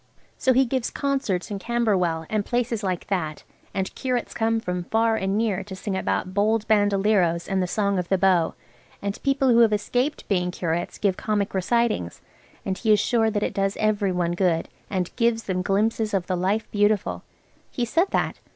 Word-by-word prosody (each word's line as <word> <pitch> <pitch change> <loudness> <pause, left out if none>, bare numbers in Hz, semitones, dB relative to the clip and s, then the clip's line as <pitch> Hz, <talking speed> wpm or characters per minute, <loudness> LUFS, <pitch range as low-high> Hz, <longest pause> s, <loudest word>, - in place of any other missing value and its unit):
So 260 - +2
he 265 +2 +4
gives 255 -1 -1
concerts 265 -9 -1
in 200 - -3
Camberwell, 190 -8 0
and 215 -1 0
places 240 -1 -1
like 185 -3 -2
that, 160 -6 -2 0.3
and 190 -1 -3
curates 250 -3 -2
come 225 0 +1
from 180 -4 -3
far 225 +2 +2
and 195 -1 -1
near, 220 -4 0
to 195 -2 -7
sing 190 +1 -4
about 185 0 -1
Bold 215 +2 +1
Bandaleros 200 -4 +2
and 195 -1 0
the 180 - 0
Song 200 0 0
of 175 - -4
the 190 - +3
Bow, 180 -3 +2 0.4
and 200 0 -4
people 275 -1 +2
who 235 -1 +5
have 230 -2 +6
escaped 245 +7 -1
being 180 -3 +1
curates 175 -1 -3
give 195 -3 0
comic 210 -2 -1
recitings, 195 - 0 0.5
and 190 -1 -2
he 220 - +2
is 210 - +5
sure 225 +1 +2
that 210 -1 -1
it - - -1
does 195 0 -1
every 210 -2 +1
one 175 -1 0
good, 175 -2 0 0.2
and 185 -3 -2
"gives 230 -2 +2
them 185 -1 -1
glimpes 210 +3 0
of 185 -2 0
the 185 - -1
Life 195 +5 0
Beautiful." 205 -1 +1 0.5
He 245 - -2
said 330 - +2
that. - - -1
205 Hz, 190 wpm, -24 LUFS, 185-225 Hz, 0.5 s, have